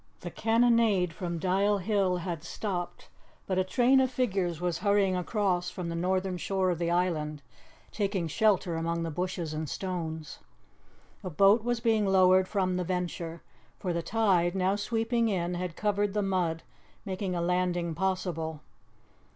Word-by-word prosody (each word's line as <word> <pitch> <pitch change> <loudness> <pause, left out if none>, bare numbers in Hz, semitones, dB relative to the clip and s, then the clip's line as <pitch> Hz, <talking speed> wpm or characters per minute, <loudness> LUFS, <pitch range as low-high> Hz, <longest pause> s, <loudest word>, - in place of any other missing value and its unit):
The 175 - -6
cannonade 225 -5 +3
from 170 0 -4
Dial 195 +4 +2
Hill 195 -2 +1
had 170 -3 -4
stopped, 180 -1 -4 0.4
but 185 -1 0
a - - +3
train 245 +7 +3
of 260 -1 +3
figures 195 -10 -1
was 175 -1 -1
hurrying 200 -2 +2
across 180 -1 0
from 180 -3 -5
the 165 - -3
northern 185 +1 0
shore 190 +1 0
of 170 - -3
the 170 -1 0
island, 155 -4 -1 0.5
taking 195 -5 -1
shelter 190 -1 +2
among 165 +1 -1
the 165 - -3
bushes 180 -1 -3
and 155 -1 -4
stones. 165 -4 -5 0.8
A 185 - -4
boat 200 +7 +4
was 240 0 -1
being 220 -3 +2
lowered 185 -1 +5
from 185 -3 0
the 180 - -1
Venture, 175 -2 -4 0.3
for 180 -3 -2
the 170 - -1
tide, 185 -4 +2
now 190 +1 +1
sweeping 225 +2 0
in, 180 -3 -1
had 175 -1 -4
covered 205 -1 0
the 210 - +1
mud, 180 -4 -1 0.4
making 190 -1 -3
a - - -1
landing 175 -1 0
possible. 165 -3 -2
185 Hz, 160 wpm, -29 LUFS, 170-200 Hz, 0.8 s, lowered